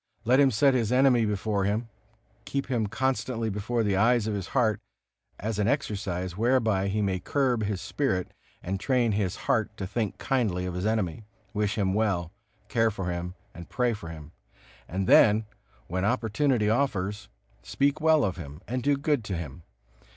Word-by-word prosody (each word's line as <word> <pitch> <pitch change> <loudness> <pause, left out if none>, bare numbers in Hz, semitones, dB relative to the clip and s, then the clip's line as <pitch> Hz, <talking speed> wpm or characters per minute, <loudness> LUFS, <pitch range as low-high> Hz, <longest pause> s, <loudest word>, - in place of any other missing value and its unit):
Let 125 +4 +4
him 140 -1 +6
set 135 +4 +3
his 120 -3 +1
enemy 125 -3 +4
before 105 -1 -1
him, 105 +4 -1 0.6
keep 140 -1 -3
him 115 -4 +1
constantly 115 0 -1
before 110 +4 -1
the 100 -2 +1
eyes 120 +2 +3
of 110 - -1
his 100 -2 -3
heart, 115 -6 +1 0.6
as 110 0 -3
an 105 - +2
exercise 100 - -2
whereby 110 -3 +2
he 105 +2 0
may 95 -2 0
curb 130 0 0
his 100 -2 -2
spirit 110 -11 -1 0.3
and 95 +2 -3
train 125 0 +2
his 100 -3 -1
heart - - 0
to 95 - -3
think 105 +2 -2
kindly 110 -10 0
of 90 - -3
his 90 +4 -2
enemy, 105 -3 -1 0.3
wish 105 0 -1
him 95 -3 +1
well, 95 -6 0 0.4
care 115 -3 +2
for 95 -4 -3
him 90 +1 -4 0.2
and 85 -1 -10
pray 125 -2 +1
for 105 -6 -7
him; 80 -2 -10 0.6
and 95 +3 -2
then, 105 +3 +6 0.4
when 95 +2 -2
opportunity 115 +1 +1
offers, 105 -4 -1 0.3
speak 140 +2 0
well 160 -2 +4
of 95 -2 -1
him 75 -3 -8
and 125 +1 -2
do 140 +2 +2
good 145 -3 0
to 95 -4 -3
him. 80 -1 -7
105 Hz, 175 wpm, -27 LUFS, 95-125 Hz, 0.6 s, him